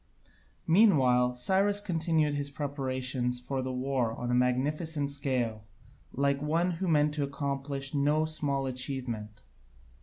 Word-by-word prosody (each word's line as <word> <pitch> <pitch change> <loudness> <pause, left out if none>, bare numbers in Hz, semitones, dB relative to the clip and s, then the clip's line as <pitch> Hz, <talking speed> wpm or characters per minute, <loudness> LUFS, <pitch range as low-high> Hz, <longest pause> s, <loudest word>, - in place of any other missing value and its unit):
Meanwhile 130 - +4
Cyrus 195 +10 +2
continued 160 -5 0
his 145 0 -2
preparations 130 -3 -3
for 130 +2 -3
the 130 0 -3
war 125 -2 -1
on 120 0 -3
a - - +1
magnificent 140 +4 0
scale, 125 -6 -2 0.5
like 140 0 0
one 165 +4 +1
who 180 +2 -3
meant 150 -2 +3
to 150 -1 -1
accomplish 140 0 -3
no 150 +2 +2
small 145 -3 +1
achievement. 125 -5 -4
140 Hz, 125 wpm, -29 LUFS, 125-150 Hz, 0.5 s, Meanwhile